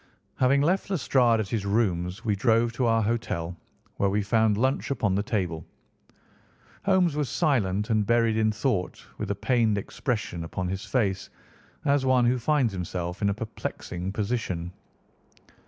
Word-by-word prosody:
Having 135 +2 +3
left 185 +6 +1
Lestrade 125 - +3
at 110 - -1
his 110 -4 -1
rooms, 100 -1 0
we 105 -2 +2
drove 115 +2 +2
to 120 0 0
our 115 -1 +3
hotel, 90 -6 -2 0.4
where 100 - +2
we 105 +1 0
found 110 0 +2
lunch 130 +4 0
upon 105 -8 0
the 100 - +1
table. 90 -7 -2 1.2
Holmes 185 -5 +3
was 145 -4 -1
silent 110 - +1
and 110 -1 +3
buried 115 +1 +2
in 110 0 +2
thought 105 -4 -2
with 105 - -3
a 100 - 0
pained 110 -1 +1
expression 105 -4 -3
upon 90 +2 -4
his 95 +2 -3
face, 100 -5 -1 0.6
as 140 -1 +3
one 130 -2 +3
who 125 +1 +2
finds 130 -3 +1
himself 90 0 -4
in 100 - +2
a - - +1
perplexing 95 -4 -5
position. 100 -5 -2
110 Hz, 155 wpm, -26 LUFS, 95-125 Hz, 1.2 s, Having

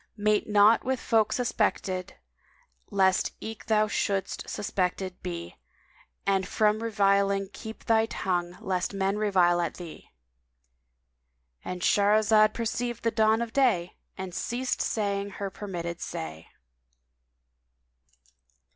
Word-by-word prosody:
Mate 210 +1 +1
not 210 +2 +5
with 260 0 -1
folk 220 -2 +2
suspected, 195 -6 -1 0.7
lest 190 -2 +2
eke 220 0 -8
thou 215 -1 +3
shouldst 195 -2 -2
suspected 185 -1 -2
be 85 0 -6 0.3
* - - -32
And 195 -1 +1
from 215 +1 +2
reviling 200 -3 +2
keep 220 0 -9
thy 225 0 +3
tongue 175 -4 -2
lest 185 +1 -2
men 195 +1 0
revile 180 -4 +3
at 170 - -2
thee!" 170 -3 -10 1.5
—And 180 -1 -5
Shahrazad 215 +1 +4
perceived 235 +1 -3
the 230 - +2
dawn 220 +1 +3
of 230 0 -8
day 220 -11 +2 0.2
and 190 -1 -6
ceased 245 +7 -2
saying 200 -2 -1
her 200 -1 -4
permitted 175 -4 -5
say. 80 0 -6
200 Hz, 115 wpm, -27 LUFS, 185-220 Hz, 1.5 s, not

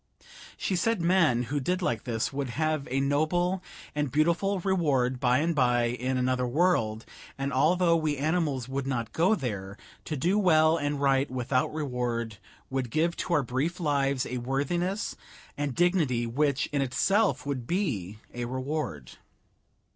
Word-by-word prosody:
She 190 - -1
said 225 +4 +1
men 170 -8 +3
who 145 - +1
did 180 +7 -1
like 120 -7 -1
this 115 +1 -2
would 135 -2 -2
have 155 +2 -1
a 135 +2 0
noble 155 +7 +1 0.3
and 150 -3 -1
beautiful 170 +7 +1
reward 145 -10 +1
by 125 0 +3
and 165 +4 +1
by 120 -4 +2
in 125 +2 -2
another 125 0 +1
world, 120 -7 +1 0.3
and 135 0 -2
although 170 +5 +3
we 155 -3 0
animals 145 -4 0
would 135 0 -3
not 120 -4 -2
go 180 +7 +3
there, 100 - -5 0.3
to 155 - -3
do 180 +10 +2
well 160 -4 +4
and 145 -2 -1
right 135 0 +2
without 130 0 0
reward 125 -7 -3 0.3
would 130 -2 -2
give 165 +7 +1
to 175 - -2
our 150 - +2
brief 135 +9 -2
lives 140 -4 +1
a 125 0 -4
worthiness 170 - -1 0.4
and 145 -3 -3
dignity 160 -10 +2
which 140 +3 +1
in 145 -2 0
itself 195 - +1
would 130 -4 -3
be 115 - -2 0.2
a 120 0 -3
reward. 130 - -4
140 Hz, 155 wpm, -28 LUFS, 125-170 Hz, 0.4 s, well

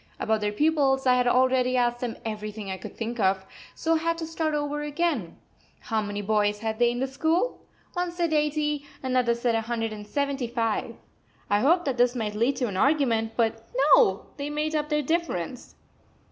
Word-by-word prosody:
About 220 -1 0
their 210 0 0
pupils 275 +1 +2
I 255 - +5
had 250 0 +2
already 255 0 +3
asked 240 0 +1
them 245 -2 -4
everything 210 -2 -5
I 190 - -3
could 190 - -10
think 235 +1 -4
of, 190 -1 +2 0.3
so 330 - 0
I - - +4
had 335 +1 0
to 330 - -4
start 320 -1 -1
over 295 0 -2
again: 295 - -1 0.4
How 220 -2 -1
many 205 0 -4
boys 210 0 +1
had 220 0 -3
they 240 0 +5
in 240 0 -2
the 265 - +1
school? 320 - 0 0.3
One 355 -1 -1
said 345 -2 -1
eighty, 300 -1 0 0.2
another 255 -2 +2
said 235 0 0
a 225 - +1
hundred 225 -1 -2
and 210 -1 -9
seventy 280 0 -1
five. 230 -2 -1 0.6
I 205 - +4
hoped 340 +9 +3
that 270 -3 -1
this 245 +1 +3
might 215 -3 -2
lead 235 +6 +1
to 250 -1 -1
an 195 -3 -4
argument, 235 -4 +2
but 225 -1 0 0.3
no, 190 +1 +3
they 285 0 -4
made 300 +1 -2
up 300 -1 -1
their 300 -1 +1
difference. 260 - -2
250 Hz, 200 wpm, -26 LUFS, 220-295 Hz, 0.6 s, I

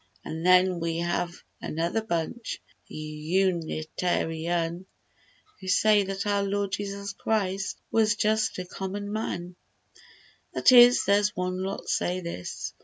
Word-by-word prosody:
An' 160 - -5
then 185 0 +4
we 165 0 -2
have 175 0 -1 0.3
another 170 +7 -1
bunch— 215 +3 -3 0.3
The 155 +2 -5
Unita 170 -1 -1
ri 160 0 -5
an, 170 +1 -1 0.7
Who 190 - -10
say 210 +2 +4
that 195 0 -3
our 205 -1 +1
Lord 200 0 -1
Jesus 200 0 -4
Christ 195 -2 -1
Was 215 -2 +3
just 215 0 +1
a 185 - -4
common 200 +3 -5
man— 180 -5 -4 1.0
That - - +5
is, 245 0 +8
there's 205 +1 +3
one 185 0 -2
lot 195 +1 -4
say 180 +1 0
this. 170 - -6
185 Hz, 135 wpm, -27 LUFS, 170-205 Hz, 1.0 s, is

